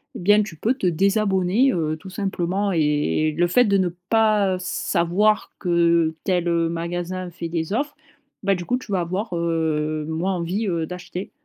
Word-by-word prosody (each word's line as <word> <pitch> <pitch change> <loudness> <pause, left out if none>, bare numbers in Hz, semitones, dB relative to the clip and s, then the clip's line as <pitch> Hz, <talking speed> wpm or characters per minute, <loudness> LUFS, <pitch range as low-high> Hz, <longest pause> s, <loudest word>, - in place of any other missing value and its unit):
et - - -6
bien 205 +4 +4
tu 180 -6 -9
peux 230 +11 +1
te 225 - -4
désabonner, 195 +5 +2
heu, 155 -3 -1
tout 190 - -11
simplement 195 0 -1
et 150 -1 +1
et - - -2
le 175 +3 +2
fait 245 +8 +4
de 200 -2 +3
ne 185 -2 +1 0.2
pas 215 -4 +3
savoir 185 +4 +1
que 170 -3 +2
tel, 180 -2 0
heu, 170 -1 +1
magasin 175 +2 -4
fait 170 0 -6
des 165 +2 -2
offres, 285 +5 -1 0.5
bah, 195 0 +3
du 175 - -5
coup, 250 - 0
tu 250 -4 -10
vas 190 - +1
avoir, 185 +4 -3
heu, 155 -2 -1
moins 170 +4 -1
envie, 180 +5 -2
heu, 170 -3 -1
d'acheter. 180 +2 -7
180 Hz, 185 wpm, -22 LUFS, 170-200 Hz, 0.5 s, bien